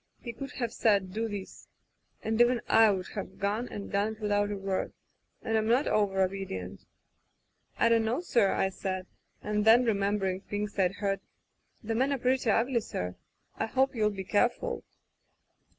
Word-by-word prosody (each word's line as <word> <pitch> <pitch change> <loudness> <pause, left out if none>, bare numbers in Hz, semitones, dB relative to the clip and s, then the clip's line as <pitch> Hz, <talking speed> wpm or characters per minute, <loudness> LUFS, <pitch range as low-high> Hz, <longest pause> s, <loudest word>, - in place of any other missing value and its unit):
He 235 - -7
could 275 +4 -7
have 235 -3 -3
said: 200 -6 +2
*Do 225 +2 -1
this,' 205 -3 -8 0.6
and 225 +1 +1
even 240 0 +4
I 225 -1 +6
would 190 -3 -1
have 200 - -6
gone 210 +4 -1
and 200 - -7
done 205 +2 +1
it 220 - -15
without 205 -1 +1
a 205 - -3
word, 195 -1 -2 0.5
and 225 - -1
Vm 220 0 +1
not 245 +5 +3
over 195 -2 +2
obedient. 185 - -4 0.9
"*I - - +4
don't 230 -1 +3
know, 235 +6 0
sir,* 235 - +2
I 190 - +1
said, 185 -1 -4 0.4
and 210 0 0
then, 230 +3 +6
re 225 - +3
membering 200 -2 0
things 210 0 -3
Fd 190 -1 +1
heard: 200 -1 -1 0.6
*The 225 +1 -2
men 260 +5 +1
are 280 - +1
pretty 255 -1 +1
ugly, 235 +3 +2
sir. 90 - -4 0.4
I - - -1
hope 265 +4 +1
you'll 215 -3 +2
be 195 -2 -5
careful. 240 - 0
210 Hz, 180 wpm, -29 LUFS, 195-230 Hz, 0.9 s, I